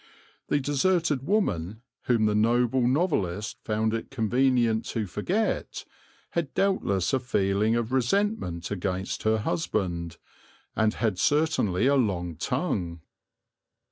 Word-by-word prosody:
The 145 - +2
deserted 145 0 +1
woman, 110 - 0 0.2
whom 115 -3 +2
the 105 - +2
noble 120 +3 +2
novelist 115 - 0
found 110 0 0
it 115 - -3
convenient 120 -2 +2
to 110 -2 -2
forget, 175 - -2 0.5
had 170 -5 -2
doubtless 100 - +1
a 135 - +3
feeling 105 -2 +1
of 120 0 -1
resentment 130 - 0
against 95 -1 -3
her 110 0 +2
husband, 85 -3 -2 0.6
and 110 0 +2
had 105 -6 -1
certainly 145 - +2
a 140 - +4
long 90 - 0
tongue. 85 - -2
110 Hz, 115 wpm, -27 LUFS, 95-135 Hz, 0.6 s, a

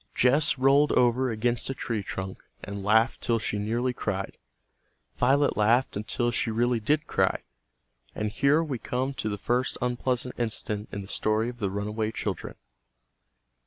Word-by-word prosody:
Jess 140 +4 +4
rolled 140 +3 +4
over 125 +1 +3
against 120 +2 0
a 135 - -2
tree 115 -4 -2
trunk 95 -1 -6 0.2
and 100 -1 -6
laughed 110 +4 +3
till 115 - +1
she 105 -1 -2
nearly 120 +4 -1
cried. 95 -5 -3 0.8
Violet 140 +3 +3
laughed 115 +5 +2
until 110 +3 -1
she 115 - -1
really 120 +2 +1
did 150 +7 +1
cry. 95 -8 0 0.7
And 105 -1 -2
here 150 +7 +3
we 140 -7 -4
come 130 +4 -2
to 135 -5 -2
the 105 - -3
first 125 +5 0
unpleasant 125 0 -1
incident 110 -2 -2
in 100 - -5
the - - -11
story 110 +3 0
of 120 -1 -9
the 100 - 0
runaway 105 +2 -2
children. 100 -6 -4
120 Hz, 160 wpm, -27 LUFS, 105-130 Hz, 0.8 s, Jess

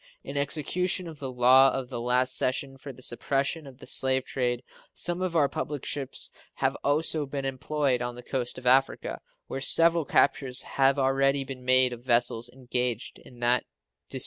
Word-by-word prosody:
In 140 - -7
execution 170 +6 0
of 160 -3 -10
the 135 -2 -5
law 130 +2 +6
of 130 -2 -4
the 120 - -5
last 125 +1 +2
session 135 +1 -1
for 140 - -8
the 130 0 -12
suppression 140 +5 -1
of 130 -2 -13
the - - -12
slave 130 0 +1
trade 125 -1 -2 0.3
some 175 +1 -1
of 185 -2 -2
our 150 -3 +4
public 150 -2 -5
ships 140 -3 -2 0.2
have - - 0
also 150 +1 +1
been 135 0 -4
employed 135 -1 -1
on 120 0 -4
the 125 - -10
coast 125 -1 -4
of 130 - -10
Africa, 125 - +2 0.2
where 135 - -5
several 165 +3 +4
captures 130 -2 +2
have 135 +1 +2
already 135 +1 +2
been 130 -2 -8
made 130 0 +5
of 120 0 -10
vessels 120 -1 +1
engaged 125 -2 -3
in 120 -1 -16
that 120 +1 +3
disgraceful - - -43
traffic. - - -5
135 Hz, 185 wpm, -27 LUFS, 125-140 Hz, 0.3 s, law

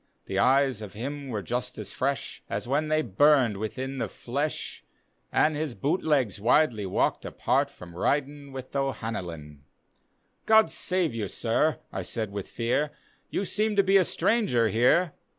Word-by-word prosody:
The 95 - -2
eyes 130 0 +3
of 105 -3 -8
him 140 +5 -5
were 105 -5 -3
just 120 -1 -3
as 105 -2 -6
fresh 135 +1 -2
As - - -3
when 145 +4 +1
they 155 0 +2
burned 130 -1 +4
within 130 +6 -4
the - - -1
fle^; 145 +5 -4 0.5
And 155 0 +3
his 150 -4 -3
boot 155 +7 0
legs 130 - +1
widely 115 -3 +3
walked 95 - 0
apart - - 0
From 85 -1 -13
riding 145 +6 -1
with 130 0 -8
O'Hanlon. 90 - -4 0.9
"God 220 0 +6
save 180 -7 +1
you, 110 -3 -3
Sir!" 125 +10 +1 0.2
I - - -2
said 110 -3 -4
with 100 -1 -5
fear, 125 +6 0 0.2
" - - -38
You 200 - -1
seem 215 +2 +1
to 200 - +5
be 195 +1 +5
a 190 - +5
stranger 170 - +2
here." 130 - +3
135 Hz, 165 wpm, -27 LUFS, 110-155 Hz, 0.9 s, God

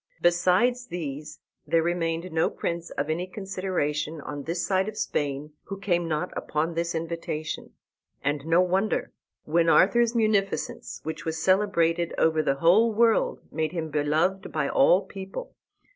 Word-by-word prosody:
Besides 185 +9 +3
these 150 - -6 0.3
there 165 -1 +3
remained 170 0 -1
no 160 0 +2
prince 170 0 -4
of 145 - -3
any 170 +4 -2
consideration 180 -6 -2
on 145 0 -6
this 170 +3 -2
side 190 +1 +1
of 215 - -10
Spain 145 +1 -2
who 195 - -6
came 175 -3 0
not 155 -2 -2
upon 155 +3 -1
this 170 0 -2
invitation. 160 -1 -4 0.5
And 145 0 0
no 165 +2 +5
wonder, 190 +3 0 0.3
when 165 +2 +2
Arthur's 235 +7 +4
munificence, 215 -3 0
which 160 +1 -5
was 160 -1 -3
celebrated 170 -2 +2
over 160 -1 +3
the 135 -3 +1
whole 185 +10 +4
world, 225 +1 +2
made 160 +1 -2
him 160 -3 -3
beloved 155 +6 0
by 150 -3 0
all 180 +9 +4
people. 195 - -8
170 Hz, 145 wpm, -26 LUFS, 155-190 Hz, 0.5 s, no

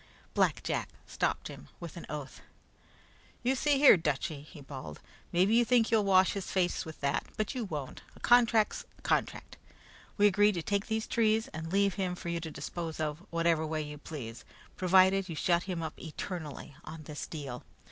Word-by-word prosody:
Black - - +2
Jack - - -2 0.2
stopped - - -1
him, - - -10
with - - -8
an - - -8
oath. - - -6 1.0
"You 255 +2 +3
see 285 +2 +2
here, 275 -7 +8
Dutchy," 150 -2 -2
he 150 +1 -13
bawled, 130 - -8 0.3
"mebby 185 +5 +3
you 240 +1 +6
think 235 -2 +3
you'll 220 -2 +4
wash 190 -1 +5
his 200 -2 -4
face 180 -2 0
with 160 -1 -9
that, 140 0 0
but 215 +4 -1
you 250 -4 -3
won't. 150 -8 -5
A - - -15
contract's 230 -3 +4
a - - -21
contract. - - -1 0.6
We 205 - +5
agreed 205 +1 +5
to 170 -3 -3
take 200 +2 0
out - - -17
these 220 0 0
trees 220 -1 +2
and 160 +1 -6
leave 200 0 +3
him 180 -1 -1
for 175 -1 -6
you 170 0 -1
to 165 -1 -5
dispose 165 +1 -5
of 150 -1 -2
whatever 165 -1 +2
way 155 0 -2
you 150 0 -8
please, 125 -7 -7 0.3
provided 190 +1 +4
you 165 - -4
shut 170 +2 +2
him 170 -3 -2
up 160 - -6
eternally 160 -3 -6
on 155 0 -9
this 150 0 -6
deal. 140 -6 -6
175 Hz, 190 wpm, -31 LUFS, 155-205 Hz, 1.0 s, here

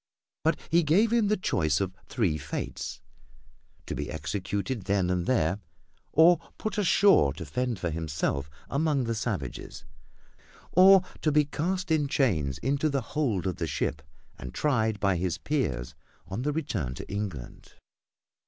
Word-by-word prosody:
But - - +2
he 170 +1 +5
gave 195 +9 +3
him 230 -3 +3
the 210 +1 +2
choice 80 - +1
of 95 -2 -2
three 100 - 0
fates, - - -5 0.8
to - - -4
be 75 - -4
executed 95 - -3
then 95 -2 +1
and 90 -1 -1
there, 100 -7 +2 0.5
or 165 +2 +6 0.2
put 215 -1 -3
ashore 195 - +5
to - - -7
fend 125 -2 -2
for 90 -2 -2
himself 75 -3 -2 0.2
among 145 -2 +1
the 115 -1 -1
savages, 105 - -4 0.9
or 190 +1 +7 0.2
to 155 - +2
be 150 0 +4
cast 180 +5 -2
in 150 -3 +2
chains 80 - +1
into 140 +4 +1
the 140 -2 0
hold 120 - 0
of 95 - -2
the 80 - -2
ship 75 -1 -2 0.4
and 65 0 -8
tried 110 -8 +1
by 100 -3 +2
his 90 0 -1
peers 70 - -2 0.3
on 95 +5 -4
the 145 +3 0
return 110 - -2
to - - -8
England. 100 -11 -6
110 Hz, 155 wpm, -28 LUFS, -, 0.9 s, or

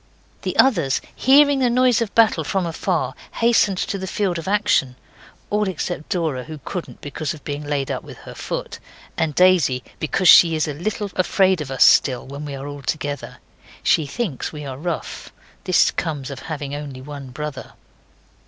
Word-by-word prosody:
The - - -3
others, 170 - +3 0.2
hearing 285 +1 +5
the 255 -2 +3
noise 250 -1 +3
of 220 -3 -3
battle 225 -1 +4
from 190 -3 -1
afar, 165 -1 -1 0.2
hastened 230 -4 +3
to 195 - -2
the 190 - -5
field 185 -3 -1
of 165 - -8
action, 200 -11 +2 0.6
all 210 0 +1
except 175 -3 -4
Dora, 160 -9 -1
who 155 0 -8
couldn't 180 -3 -6
because 145 +1 -4
of 150 - -15
being 145 0 -4
laid 145 -2 -2
up - - -3
with - - -12
her - - -9
foot, - - -5 0.4
and 155 -3 -1
Daisy, 175 -9 +4 0.2
because 180 +4 0
she 165 -1 +8
is 155 0 0
a 150 - -3
little 200 +5 -3
afraid 185 -1 +2
of 145 - -5
us 135 -1 +3
still, 130 -3 +4
when 140 +2 -7
we 140 -1 -5
are 135 +1 -7
all 145 0 -7
together. 145 +1 -4 0.5
She 155 -3 +3
thinks 170 - -3
we 150 -1 -8
are 135 -2 -5
rough. 170 +6 -5 0.3
This 185 -3 +4
comes 145 -5 -3
of 135 - -7
having 145 -3 -4
only 145 -3 -6
one 140 0 -8
brother. 145 0 -7
155 Hz, 180 wpm, -21 LUFS, 145-195 Hz, 0.6 s, she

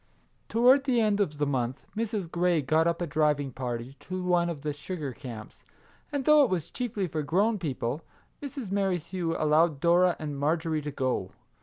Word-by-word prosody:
Toward 255 +4 +5
the 255 -4 +2
end 210 -2 +2
of 155 -7 0
the 145 - +1
month 130 -1 -2
Mrs. 215 -3 -2
Grey 175 -3 +2
got 155 +5 +3
up 170 +1 0
a - - 0
driving 150 -3 +1
party 125 +1 -5
to 185 0 -5
one 175 -1 +2
of 150 -4 -6
the 150 -1 -1
sugar 150 -2 -5
camps, 115 -4 -10 0.5
and 280 -3 -2
though 300 -1 +7
it 270 - +4
was 170 -3 -2
chiefly 220 -6 -2
for 155 -1 -3
grown 200 +9 +1
people, 140 -3 -3 0.4
Mrs. 275 -8 -6
Merrithew 180 -3 -1
allowed 155 0 +3
Dora 175 +2 +4
and 145 -3 -5
Marjorie 160 +1 0
to 150 - -4
go. 130 -9 -1
165 Hz, 180 wpm, -28 LUFS, 145-195 Hz, 0.5 s, though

